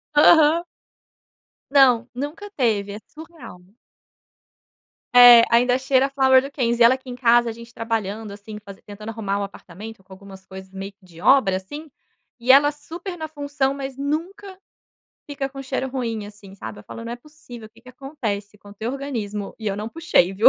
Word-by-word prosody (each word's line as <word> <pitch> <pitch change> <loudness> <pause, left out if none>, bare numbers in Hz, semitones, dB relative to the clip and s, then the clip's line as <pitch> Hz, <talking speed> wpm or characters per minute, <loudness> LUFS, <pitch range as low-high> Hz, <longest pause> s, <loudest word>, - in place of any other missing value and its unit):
Aham. 315 +2 +6 1.1
Não, 255 -4 +5
nunca 295 +11 -6
teve, 215 - -1
é 210 - -7
surreal. 315 - -13 1.5
É, 245 -1 +10
ainda 245 +2 +4
cheira 265 0 +2
a - - -11
Flower 265 -1 +4
do 275 - -7
Kenzo, 240 -4 -1
e - - +9
ela 240 +3 +6
aqui 260 0 -15
em 245 - -6
casa 240 -1 +3
a - - -8
gente 235 +1 -13
trabalhando 220 -2 -4
assim, 210 +1 -10
fazen 200 -1 -12
tentando 210 +2 -9
arrumar 205 -3 -3
o - - -2
apartamento 200 +2 -10
com 190 - -25
algumas 190 0 -13
coisas 190 0 -12
meio 195 +1 -7
que 195 -1 -26
de 170 -2 -15
obra 220 -8 +4
assim, 290 +11 -9 0.5
e 245 +2 +4
ela 290 +2 +6
super 345 +5 -8
na 315 -2 -6
função, 285 -2 -2
mas 270 -1 -6
nunca 360 +8 -4 0.7
fica 285 -2 -4
com 275 0 -9
cheiro 265 0 -3
ruim, 230 -5 -3
assim 205 -2 -14
sabe. 110 - -9
Eu - - -18
falo: 230 - -9
"Não 230 - -5
é - - -5
possível, 245 -4 -13
o 215 - -19
que 230 +1 -22
que 255 - -13
acontece 225 -7 -5
com 205 0 -15
teu 220 +4 -4
organismo 225 -8 -5
e 220 - -8
eu 200 -1 -1
não 210 - -5
puxei 320 - +1
viu". 200 +3 +6
240 Hz, 190 wpm, -22 LUFS, 205-275 Hz, 1.5 s, É